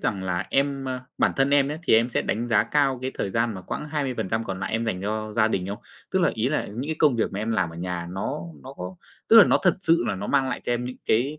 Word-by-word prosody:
rằng 95 -2 -1
là 90 -1 -2
em, 140 0 +1
ơ 130 -1 -3 0.2
bản - - +3
thân 135 +1 +2
em 140 -1 +4
ấy 150 +2 -4
thì - - +4
em 115 +2 +4
sẽ - - 0
đánh 120 +2 -2
giá 110 -3 +4
cao 135 0 +1
cái 130 - -2
thời 95 - -2
gian 115 +1 0
mà 95 - -6
quãng - - -5
20% 130 -7 -2
còn 95 -2 -5
lại 95 - -3
em 115 +1 0
dành 100 -5 -2
cho 110 +1 -3
gia 110 0 +3
đình 95 -4 -1
không? 100 - -4 0.3
Tức 190 - +1
là - - +4
ý 110 +3 0
là 150 - -1
những 120 +7 -5
cái 160 - -2
công 145 -6 +4
việc 115 - 0
mà 95 - -4
em 110 +2 -2
làm 95 -6 0
ở 85 - -11
nhà 90 0 -4
nó 95 +2 -3 0.2
nó - - -9
có 90 +1 -7 0.3
tức 225 - +7
là 215 - +10
nó - - +3
thật 180 - +4
sự 165 -6 +3
là - - 0
nó 100 +2 -5
mang 135 -2 +2
lại - - -3
cho - - 0
em 120 0 -1
những 125 +1 -6
cái 135 +7 +1
115 Hz, 300 wpm, -25 LUFS, 100-135 Hz, 0.3 s, là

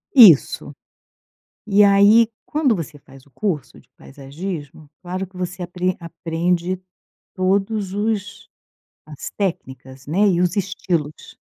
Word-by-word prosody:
Isso! 200 - +6 0.9
E 205 0 +4
aí, 205 +3 +6 0.2
quando 290 -6 +1
você 155 -3 -7
faz 135 -1 -17
o - - -23
curso 150 - -3
de - - -28
paisagismo, 145 +2 -8
claro 185 +2 -4
que 185 0 -19
você 180 0 -5
apren 180 +1 -2
aprende 170 +2 -2 0.5
todos 195 +1 0
os 205 -1 -3 0.6
as 150 -3 -8
técnicas, 130 -9 -5
né, 200 +7 +2
e 175 -2 +2
os 180 -1 +1
estilos. 175 -6 -3
180 Hz, 120 wpm, -21 LUFS, 155-200 Hz, 0.9 s, Isso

